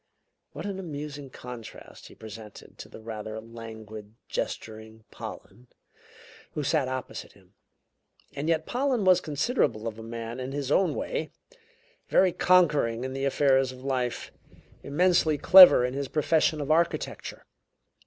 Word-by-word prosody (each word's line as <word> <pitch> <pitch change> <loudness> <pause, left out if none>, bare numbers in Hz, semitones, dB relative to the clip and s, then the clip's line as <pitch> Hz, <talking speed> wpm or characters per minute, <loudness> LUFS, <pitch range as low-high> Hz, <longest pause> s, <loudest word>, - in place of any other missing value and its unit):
What - - -7
an 195 -2 -4
amusing 145 -5 -7
contrast 125 -3 -11
he - - -15
presented 110 -1 -12
to - - -9
the - - -12
rather 110 -1 -6
languid, 110 -2 -10
gesturing 110 0 -6
Pollen, 120 +6 -10 0.9
who 150 - -3
sat 140 -1 +1
opposite 130 0 -6
him! - - -24 0.8
And 145 +3 -3
yet 160 -1 +1
Pollen 250 -4 0
was 185 -1 +5
considerable 145 - -1
of 110 -1 -6
a - - -7
man 115 +1 -6
in 130 +1 -5
his 140 -1 -3
own 190 +4 +2
way; - - -3 0.8
very 185 -1 +4
conquering 150 -11 +3
in 130 0 -4
the 135 +1 -2
affairs 135 -1 +2
of 130 0 -12
life; 130 -3 -2 0.5
immensely 160 0 +2
clever 180 -5 +9
in 125 - -3
his 140 0 -3
profession 155 +1 +1
of 145 +1 -2
architecture. 170 +2 -1
135 Hz, 140 wpm, -27 LUFS, 115-160 Hz, 0.9 s, clever